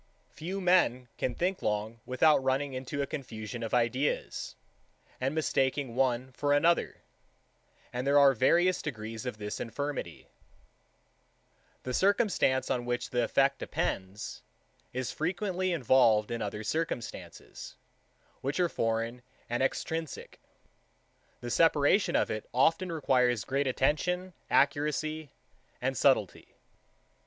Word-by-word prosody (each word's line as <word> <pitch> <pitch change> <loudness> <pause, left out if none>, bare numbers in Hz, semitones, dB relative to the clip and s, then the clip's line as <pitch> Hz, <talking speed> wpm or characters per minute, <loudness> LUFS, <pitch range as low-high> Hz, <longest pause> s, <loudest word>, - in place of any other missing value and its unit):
4. - - -33
Few 180 +6 -4
men 175 -10 +2
can 125 - -1
think 185 +2 -1
long 105 +2 -2
without 135 +3 +4
running 135 +1 0
into 130 +2 -3
a - - -1
confusion 120 -4 -6
of 115 - -4
ideas, 125 +4 -1 0.6
and 135 +3 -1
mistaking 135 -4 0
one 130 0 0
for 145 +3 0
another; 165 +4 +2 0.9
and 125 +2 -3
there 140 +1 +4
are 140 -1 +7
various 175 +9 +3
degrees 115 -3 -6
of 125 - -4
this 105 -1 -5
infirmity. 145 +5 -4
5. - - -31 1.5
The 125 - -4
circumstance, 195 - +2
on 120 -1 -1
which 120 0 -2
the 125 -1 +1
effect 135 +4 +2
depends, 95 +3 -3 0.5
is 130 0 -3
frequently 185 +2 -1
involved 120 -7 +3
in 115 -1 -3
other 105 0 -4
circumstances, 155 -1 -5 0.7
which 140 +6 -2
are 175 -1 +3
foreign 115 0 -1 0.3
and 120 - 0
extrinsic. 160 +2 -3 1.0
The 120 - -5
separation 165 - +3
of - - +2
it 110 -1 -5
often 165 +7 +3
requires 125 -8 +2
great 140 0 0
attention, 180 +8 0 0.2
accuracy, 150 +2 +1 0.5
and - - -1
subtilty. - - +1
135 Hz, 125 wpm, -30 LUFS, 120-155 Hz, 1.5 s, are